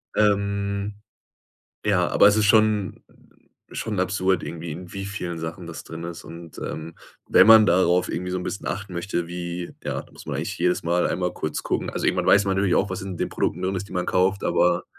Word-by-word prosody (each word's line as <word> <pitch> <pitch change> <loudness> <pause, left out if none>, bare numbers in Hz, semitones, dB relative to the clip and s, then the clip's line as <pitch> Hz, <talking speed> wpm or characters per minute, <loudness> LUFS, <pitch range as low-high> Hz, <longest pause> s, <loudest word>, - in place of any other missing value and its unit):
Ähm, 100 -1 0 0.9
ja, - - +3
aber - - +6
es 105 - +4
ist 110 - +3
schon 105 -2 +3 0.7
schon 105 -4 -3
absurd 95 -1 +1
irgendwie, 85 -1 -6
in 90 +3 -8
wie 100 - -4
vielen 90 -4 -5
Sachen 85 +2 -6
das 80 - -8
drin 80 +1 -7
ist. 85 0 -7
Und, 85 -1 -11
ähm, 80 +1 -6 0.3
wenn 95 - +7
man 110 -1 +9
darauf 90 -1 +3
irgendwie 90 0 -3
so 90 - -1
'n 90 - -4
bisschen 100 - -5
achten 100 -1 -4
möchte, 85 -1 -2
wie 85 0 -5
ja, - - -3
da - - -20
muss - - -13
man - - -3
eigentlich - - -4
jedes 90 +1 +1
Mal 85 +1 +1
einmal 90 0 -1
kurz 75 -1 -4
gucken. - - -1
Also, - - -3
irgendwann - - +1
weiß 100 0 +6
man 95 -1 +1
nämlich 95 -1 +2
auch, 100 - +2
was 95 - -4
in 95 -2 -6
den - - -1
Produkten 90 - -2
drin 95 +1 -1
ist, 95 +2 -5
die - - -10
man 90 -1 -1
kauft, 95 +2 +1
aber, 90 0 +2
90 Hz, 215 wpm, -24 LUFS, 85-100 Hz, 0.9 s, man